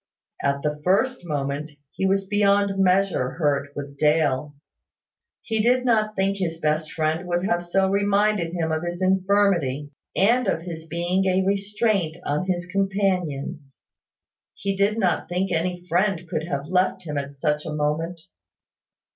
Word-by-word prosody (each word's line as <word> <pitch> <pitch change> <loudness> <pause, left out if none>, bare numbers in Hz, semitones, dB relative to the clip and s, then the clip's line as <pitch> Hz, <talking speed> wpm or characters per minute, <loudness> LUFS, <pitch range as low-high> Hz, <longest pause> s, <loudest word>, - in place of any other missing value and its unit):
At 140 0 0
the 150 0 -2
first 225 +7 +2
moment, 145 0 -2 0.2
he 190 - -1
was 195 0 +1
beyond 200 -1 +2
measure 185 -8 +2
hurt 145 -3 0
with 140 -1 -7
Dale. 150 -2 +2 0.9
He 220 -1 0
did 250 +3 +3
not 215 -3 +2
think 195 +1 +1
his 165 -4 -2
best 155 0 0
friend 160 +3 -1
would 175 +1 0
have 175 -3 0
so 190 +2 +1
reminded 200 -2 +2
him 165 -2 -1
of 160 0 0
his 175 0 -4
infirmity, 185 -7 +2 0.2
and 235 +4 +3
of 165 -3 0
his 165 -2 -7
being 175 +4 0
a 185 0 +2
restraint 200 -3 0
on 150 +6 -1
his 175 -2 -1
companions. 180 -8 -1 0.8
He 195 0 -2
did 200 +3 +2
not 180 -7 0
think 185 +2 -1
any 175 +1 -1
friend 180 0 +1
could 160 0 -3
have 140 -3 -3
left 185 +3 +1
him 150 -3 -5
at 140 0 -7
such 150 +1 0
a - - -3
moment. 160 +3 -1
175 Hz, 155 wpm, -24 LUFS, 155-195 Hz, 0.9 s, did